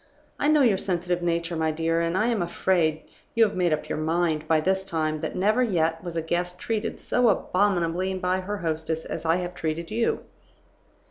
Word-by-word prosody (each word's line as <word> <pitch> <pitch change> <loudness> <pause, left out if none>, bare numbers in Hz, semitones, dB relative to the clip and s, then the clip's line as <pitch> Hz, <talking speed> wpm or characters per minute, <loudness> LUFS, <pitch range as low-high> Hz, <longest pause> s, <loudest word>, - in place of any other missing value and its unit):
I 290 - +1
know 300 -2 +5
your 210 -6 +3
sensitive 175 -2 -1
nature, 170 0 -1
my 160 -1 +1
dear, 165 +1 0
and 170 +2 0
I 215 - +2
am 225 -5 0
afraid 170 -2 +1 0.3
you 230 - +6
have 210 -2 +1
made 180 -2 +2
up 155 0 -1
your - - -3
mind 160 -1 0
by 160 -1 +4
this 190 +4 +1
time 155 -4 -1
that - - -4
never 215 +6 +2
yet 165 -8 +1
was 175 -2 -6
a 165 - -1
guest 175 +2 -2
treated 220 +2 -3
so 245 -2 +2
abominably 185 -2 +1
by 185 0 0
her 205 +3 -4
hostess 160 -2 -2
as - - -5
I 165 +1 +3
have 180 0 -3
treated 165 +1 -3
you. 230 +1 0
175 Hz, 200 wpm, -25 LUFS, 165-190 Hz, 0.3 s, you